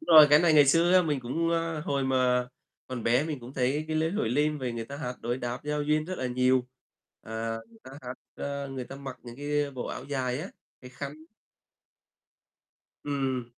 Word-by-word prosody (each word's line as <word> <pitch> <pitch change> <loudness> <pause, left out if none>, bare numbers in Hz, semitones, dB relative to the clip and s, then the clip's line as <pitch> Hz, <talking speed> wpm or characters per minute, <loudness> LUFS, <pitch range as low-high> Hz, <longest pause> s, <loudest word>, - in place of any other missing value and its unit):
Đúng 320 - +2
rồi, 150 - +12
cái 150 - +8
này 170 -1 +4
ngày 145 -2 +7
xưa 165 +5 +4
á, 185 - +7
mình 150 -5 0
cũng, 165 +8 -1
ơ, 165 -2 0
hồi 140 -2 -1
mà 125 -1 +2 0.4
còn 125 -2 -5
bé 120 +5 +3
mình 150 -5 -4
cũng 120 +2 -10
thấy 135 +4 +1
cái 155 - 0
lễ 160 +1 +1
hội 195 - 0
Lim 150 +5 +1
vầy 125 -3 -2
người 115 -1 -4
ta 140 +5 -8
hát 125 -4 -4
đối 120 +2 -2
đáp 125 0 -3
giao 150 0 -1
duyên 150 +1 +1
rất 185 +2 -5
là 130 - -1
nhiều, 125 0 +2 0.6
à, 115 0 -3
người 115 - -20
ta 130 - -11
hát, 125 0 -5 0.2
ơ, 140 -1 -4
người 130 -2 -5
ta 135 - -9
mặc 135 -2 -7
những 120 0 -10
cái 145 0 -1
bộ 130 -3 -5
áo - - -5
dài 130 -3 -1
á, 180 - -5 0.3
cái 125 - -11
khăn. 140 +3 -6 1.9
Ừm. 135 -3 -1
135 Hz, 215 wpm, -28 LUFS, 125-150 Hz, 1.9 s, rồi